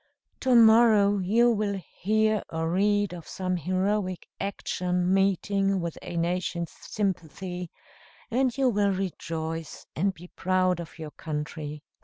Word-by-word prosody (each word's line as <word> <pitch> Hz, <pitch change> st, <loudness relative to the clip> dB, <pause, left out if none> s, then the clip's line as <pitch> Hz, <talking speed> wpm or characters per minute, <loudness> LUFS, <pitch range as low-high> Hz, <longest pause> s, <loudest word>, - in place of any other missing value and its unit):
To 255 Hz, -1 st, +3 dB
morrow 220 Hz, -3 st, +6 dB
you 230 Hz, +6 st, +4 dB
will 205 Hz, -3 st, -1 dB, 0.2 s
hear 215 Hz, +1 st, +2 dB
or 165 Hz, 0 st, -2 dB
read 205 Hz, +1 st, +2 dB
of 170 Hz, -3 st, -9 dB
some 185 Hz, -1 st, -2 dB
heroic 185 Hz, +2 st, -1 dB
action 180 Hz, -2 st, -1 dB
meeting 195 Hz, 0 st, +2 dB
with 170 Hz, -2 st, -3 dB
a 170 Hz, -, -6 dB
nation's 170 Hz, 0 st, -1 dB
sympathy, 180 Hz, -2 st, -4 dB, 0.6 s
and 255 Hz, +1 st, +1 dB
you 265 Hz, -2 st, +3 dB
will 205 Hz, -3 st, +2 dB
rejoice 165 Hz, -4 st, -4 dB
and 195 Hz, +5 st, +1 dB
be 180 Hz, -1 st, -13 dB
proud 185 Hz, -1 st, +1 dB
of 170 Hz, -1 st, -8 dB
your 155 Hz, -2 st, -7 dB
country." 150 Hz, -1 st, -5 dB
185 Hz, 130 wpm, -27 LUFS, 170-205 Hz, 0.6 s, morrow